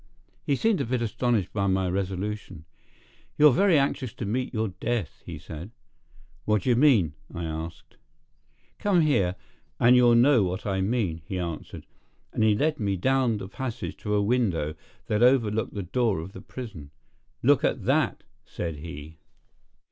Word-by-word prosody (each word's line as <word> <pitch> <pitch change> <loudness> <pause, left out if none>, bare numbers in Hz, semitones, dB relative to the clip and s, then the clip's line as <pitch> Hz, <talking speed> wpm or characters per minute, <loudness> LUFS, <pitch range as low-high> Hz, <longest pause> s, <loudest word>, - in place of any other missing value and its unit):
He 140 - +1
seemed 215 - +1
a - - -1
bit 120 0 -1
astonished 115 -3 0
by 100 -1 0
my 95 -1 +1
resolution. 95 -2 -4 0.7
"You're 150 -2 +7
very 190 -1 +4
anxious 135 -3 -1
to 120 - -5
meet 125 +5 -2
your 110 -2 -1
death," 110 -2 -3
he 85 -2 -6
said. 80 +3 -9 0.7
"What 105 -3 +1
d'ye 125 - +3
mean?" 115 - +4 0.2
I 85 - -5
asked. 80 0 -7 0.8
"Come 195 -4 +3
here, 100 - +2 0.4
and 120 +2 +6
you'll 120 -1 +6
know 125 +1 +5
what 95 +1 -2
I 95 -2 0
mean," 95 -6 -1
he 95 - -4
answered. 85 -3 -5 0.5
And - - +1
he 110 -1 +4
led 150 +6 0
me 100 -3 0
down 130 +2 +2
the 95 - -6
passage 125 +4 -5
to 105 -1 -2
a 105 - +2
window 100 -10 0 0.3
that 105 +1 0
overlooked 115 -5 +3
the 100 - -3
door 110 0 0
of 85 +4 -7
the 95 - -9
prison. 105 - -9 0.5
"Look - - +4
at - - 0
that!" - - +1 0.2
said 85 -3 -5
he. 75 0 -9
105 Hz, 165 wpm, -26 LUFS, 90-125 Hz, 0.8 s, You're